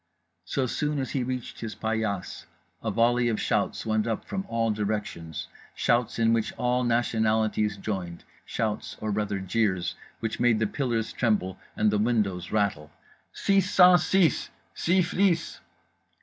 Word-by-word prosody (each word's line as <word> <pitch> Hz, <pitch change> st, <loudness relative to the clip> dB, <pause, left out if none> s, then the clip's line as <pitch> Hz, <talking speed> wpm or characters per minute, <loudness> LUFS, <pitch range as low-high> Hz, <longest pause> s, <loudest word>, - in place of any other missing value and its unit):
So 135 Hz, -, 0 dB
soon 150 Hz, +4 st, -1 dB
as 130 Hz, -2 st, -2 dB
he 135 Hz, -, 0 dB
reached 125 Hz, 0 st, -5 dB
his 110 Hz, -3 st, -5 dB
paillasse 110 Hz, -3 st, -3 dB, 0.4 s
a -, -, -1 dB
volley 120 Hz, +1 st, +3 dB
of 110 Hz, -, -1 dB
shouts -, -, 0 dB
went 110 Hz, 0 st, +1 dB
up 110 Hz, -2 st, -2 dB
from 195 Hz, 0 st, -4 dB
all 115 Hz, -1 st, 0 dB
directions, 105 Hz, -6 st, -3 dB, 0.3 s
shouts 120 Hz, -1 st, +1 dB
in 115 Hz, 0 st, +3 dB
which 115 Hz, -1 st, 0 dB
all 125 Hz, 0 st, 0 dB
nationalities 110 Hz, -3 st, +1 dB
joined, 95 Hz, -4 st, -4 dB, 0.2 s
shouts 110 Hz, -2 st, -3 dB
or 110 Hz, 0 st, -2 dB
rather 105 Hz, -1 st, -1 dB
jeers 95 Hz, -1 st, 0 dB, 0.3 s
which 115 Hz, 0 st, -3 dB
made 120 Hz, -2 st, +4 dB
the 110 Hz, -, +1 dB
pillars 115 Hz, -1 st, -1 dB
tremble 100 Hz, -6 st, 0 dB, 0.2 s
and 105 Hz, 0 st, +2 dB
the 105 Hz, -, +1 dB
windows 105 Hz, -6 st, 0 dB
rattle— 100 Hz, -9 st, 0 dB, 0.5 s
"_SIX 195 Hz, -1 st, +3 dB
CENT 180 Hz, -1 st, +6 dB
SIX! 175 Hz, -3 st, +2 dB, 0.2 s
SYPH'LIS! 180 Hz, -1 st, +1 dB
115 Hz, 145 wpm, -27 LUFS, 105-125 Hz, 0.5 s, CENT